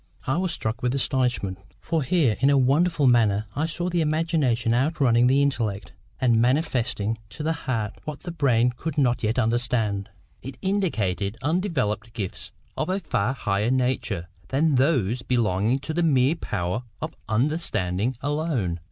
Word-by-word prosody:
'" - - -37
I 135 +4 0
was 185 -1 0
struck 110 -6 -3
with 125 +1 0
astonishment. 125 -8 0 0.2
For 165 -1 -1
here, 140 -5 +2
in 135 - +4
a 140 - +4
wonderful 150 +4 +3
manner, 110 -4 +3
I 155 +3 0
saw 175 +2 -2
the 175 -1 0
imagination 155 -7 +1
outrunning 125 -3 +3
the 135 +2 +4
intellect, 110 -9 -2 0.3
and 120 -4 +3
manifesting 120 -5 0
to 150 - -7
the 160 +1 +1
heart 115 -8 -3
what 150 -2 -6
the 175 - -6
brain 125 -7 +2
could 160 +2 -5
not 125 -4 +2
yet 110 +2 0
understand. 115 -4 0 0.3
It 135 0 -8
indicated 115 - -1
undeveloped 145 - -1
gifts 100 -4 -5 0.2
of - - -2
a 190 +2 0
far 130 - -1
higher 105 -2 0
nature 125 -9 0 0.2
than 150 +3 +2
those 130 - +2
belonging 115 -1 +1
to 160 - -4
the 175 - 0
mere 140 -3 +3
power 105 - -3 0.2
of - - -5 0.2
understanding 110 - 0
alone. 145 - -1
125 Hz, 160 wpm, -25 LUFS, 110-155 Hz, 0.3 s, in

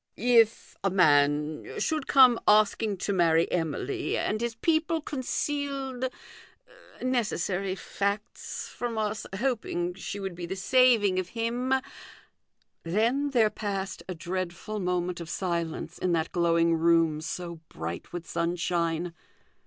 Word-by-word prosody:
" - - -43 0.3
If 225 +1 -15
a 195 - +3
man 150 -4 +2
should 310 -3 -1
come 255 -4 +7
asking 210 0 +4
to 200 - 0
marry 165 -2 +3
Emily, 160 -6 -1
and 215 +1 -1
his 235 -1 -2
people 320 +5 +1
concealed 275 -2 -2 0.9
necessary 200 -6 0
facts 200 +3 -3
from 240 -2 -4
us 215 0 -2
hoping 210 -8 -1
she 195 +2 -6
would 195 -2 -4
be 175 0 -6
the 190 - -3
saving 210 -2 +4
of 185 -1 -4
him 240 +3 -1 0.6
" - - -47
Then 230 +11 +1
there 230 -6 +3
passed 195 -2 -4
a 185 - -3
dreadful 185 +4 -4
moment 180 -1 -1
of 170 - -7
silence 170 -3 -3
in 180 -1 +1
that 165 -1 0
glowing 170 -1 +3
room, 165 -1 +3
so 170 +1 -5
bright 85 +2 -6
with 175 -2 -6
sunshine. 170 0 -1
190 Hz, 130 wpm, -28 LUFS, 170-230 Hz, 0.9 s, come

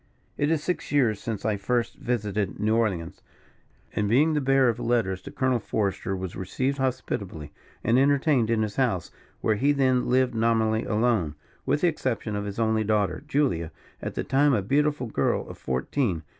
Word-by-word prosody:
"It 145 - 0
is 160 -2 +1
six 180 - -3
years 120 -8 +2
since 110 -4 -4
I 110 -2 +1
first 120 +4 -1
visited 105 -7 -2
New 110 +2 +2
Orleans; 95 -8 -1 0.7
and 105 -1 0
being 150 +8 +4
the 150 - +1
bearer 135 -1 +4
of 115 - 0
letters 110 -6 0
to - - -9
Colonel 130 -3 +1
Forester 100 -2 -2
was 95 -1 -5
received 130 +9 -2
hospitably 100 - -3 0.3
and 115 +3 +3
entertained 140 -3 +3
in 115 -1 +2
his 105 -1 -4
house, 115 -11 0 0.3
where 110 -1 +1
he 140 +6 +3
then 130 -3 +2
lived 130 0 +3
nominally 110 -1 +1
alone, 105 -9 +1 0.3
with 150 - +1
the 180 - +4
exception 120 -9 -2
of 105 0 -3
his 100 -1 -5
only 110 -1 +1
daughter, 105 +3 0
Julia, 130 - 0 0.3
at - - -5
that - - -3
time 140 0 +4
a 100 - 0
beautiful 145 +4 +1
girl 115 - 0
of - - -10
fourteen. 80 - -1
115 Hz, 180 wpm, -26 LUFS, 105-135 Hz, 0.7 s, being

